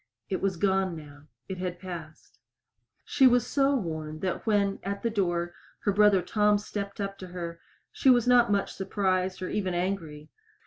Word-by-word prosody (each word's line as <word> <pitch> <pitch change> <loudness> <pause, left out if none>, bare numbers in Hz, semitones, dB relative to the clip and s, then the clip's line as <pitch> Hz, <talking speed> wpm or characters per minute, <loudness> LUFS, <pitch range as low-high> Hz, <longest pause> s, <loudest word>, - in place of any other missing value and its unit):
It 190 - -2
was 195 -2 0
gone 190 -1 +1
now. 145 -1 -12 0.2
It 190 -1 -5
had 180 -1 -3
passed. 170 -4 -9 0.7
She 265 - +5
was 245 -1 +4
so 275 0 +2
worn 160 - -4
that 185 +4 -3
when, 200 -2 +2
at 200 +1 -4
the 230 - 0
door, 175 -4 -1 0.3
her 205 - +1
brother 200 -2 +4
Tom 210 +2 +3
stepped 200 -1 -6
up 195 -1 -4
to 185 - -7
her 170 -2 -6 0.3
she 270 - +2
was 245 -3 +5
not 245 -3 +5
much 200 -1 0
surprised 190 -1 -1
or 185 - -3
even 190 -4 -1
angry. 170 -5 -3
190 Hz, 175 wpm, -28 LUFS, 175-205 Hz, 0.7 s, She